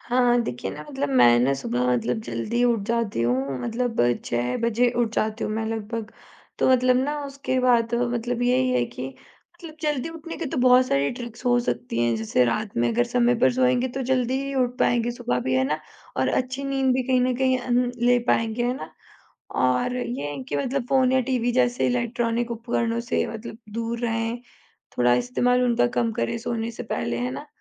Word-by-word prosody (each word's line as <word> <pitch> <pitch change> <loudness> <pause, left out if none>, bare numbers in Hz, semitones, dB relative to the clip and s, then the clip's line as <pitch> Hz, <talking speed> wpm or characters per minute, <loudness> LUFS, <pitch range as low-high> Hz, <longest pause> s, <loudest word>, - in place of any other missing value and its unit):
हाँ, 250 +1 0
हाँ। 240 0 +4
देखिए 125 - -4
ना 150 - -8
मतलब 140 +1 -2
मैं 120 -2 +5
ना 130 +3 +3
सुबह 125 -2 -1
मतलब 120 -1 0
जल्दी 120 - -2
उठ 235 -3 +2
जाती 230 - 0
हूँ 130 +2 0
मतलब 235 0 -1 0.2
6 120 +1 -1
बजे 235 +1 +2
उठ 230 -2 0
जाती 215 +1 -1
हूँ - - -2
मैं 220 +1 -2
लगभग। 225 0 -4 0.5
तो - - +3
मतलब 255 0 +4
ना 290 +3 0
उसके 275 -2 -3
बाद 235 -2 +3
मतलब 240 0 -1
यही 255 +1 +2
है 185 - +2
कि 125 +2 -7 0.5
मतल 340 -2 -10
जल्दी 295 -1 -1
उठने 330 0 -8
के 335 - -4
तो - - -4
बहुत 255 0 +5
सारी 140 - +1
ट्रिक्स 240 0 -9
हो 245 0 +4
सकती 125 - -3
हैं, 120 -1 +2
जैसे 110 +3 +1
रात 205 - -2
में 120 0 +2
अगर 120 - +2
समय 245 - +2
पर 250 - +4
सोएँगे 255 0 +2
तो 265 +2 -4
जल्दी 255 0 0
ही 275 0 -4
उठ 250 -2 0
पाएँगे 240 0 +2
सुबह 125 - -2
भी, 130 +1 -1
है 130 0 +3
ना? 150 +3 -1 0.4
और 130 0 +1
अच्छी 260 - -1
नींद 270 -1 +1
भी 260 - +1
कहीं 255 -1 +3
न 250 0 +1
कहीं 260 0 +2
हुँ, 245 -1 -2
हुँ, 245 0 +2
ले 245 +1 +3
पाएँगे, 225 +1 +1
है 245 +1 0
ना? - - -8 0.6
और 130 - +1
ये 240 - -3
है 140 -2 -6
कि 145 - -1
मतलब 245 - -1
फ़ोन 260 -1 +3
या 260 - +4
टीवी 245 -1 0
जैसे 245 -1 +2
इलेक्ट्रॉनिक 240 -1 -1
उपकरणों 235 0 -1
से 235 +1 -1
मतलब 225 0 -8
दूर 230 +1 -3
रहें, 225 +1 -1 0.6
थोड़ा 120 0 +4
इस्तेमाल 185 - +1
उनका 245 0 +3
कम 230 -1 +1
करें 235 +1 -2
सोने 230 0 -3
से 235 - -7
पहले, 120 - -2
है 125 +1 -2
ना? 135 +2 -7
235 Hz, 205 wpm, -24 LUFS, -, 0.6 s, मैं